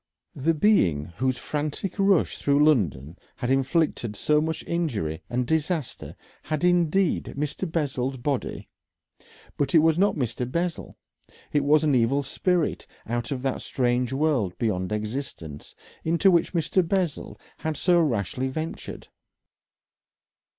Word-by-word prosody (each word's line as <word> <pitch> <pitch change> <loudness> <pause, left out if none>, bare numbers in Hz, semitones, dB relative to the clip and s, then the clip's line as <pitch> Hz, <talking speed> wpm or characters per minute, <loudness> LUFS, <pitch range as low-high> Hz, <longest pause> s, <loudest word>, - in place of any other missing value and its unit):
The 160 +4 0
being 95 - +3
whose 130 0 +1
frantic 150 +9 -4
rush 195 -3 +3
through 145 +1 +3
London 85 - +1 0.2
had 125 0 -2
inflicted 135 -4 +1
so 150 +8 +2
much 160 0 -2
injury 110 - -2
and 125 +1 0
disaster 160 0 -2 0.3
had 155 -1 -3
indeed 175 +1 +2
Mr. 150 +4 -3
Bessel's 135 -5 -1
body, 135 +1 -3 0.9
but 145 +4 0
it 160 0 +6
was 165 +1 +3
not 200 +2 +3
Mr. 125 -3 -3
Bessel. 170 +2 -3 0.6
It 145 -1 +2
was 150 +2 +4
an 150 -2 +2
evil 130 +3 +2
spirit 175 +3 0 0.2
out 120 +1 -3
of 130 -2 -3
that 135 -1 -1
strange 125 -1 0
world 135 - 0
beyond 95 -5 -1
existence, 105 - -5 0.3
into 170 +4 +3
which 170 +1 +2
Mr. 170 +2 +2
Bessel 175 -3 -2 0.2
had 160 -2 -3
so 175 -1 +3
rashly 125 - -1
ventured. 155 +5 -6
145 Hz, 130 wpm, -25 LUFS, 125-165 Hz, 0.9 s, it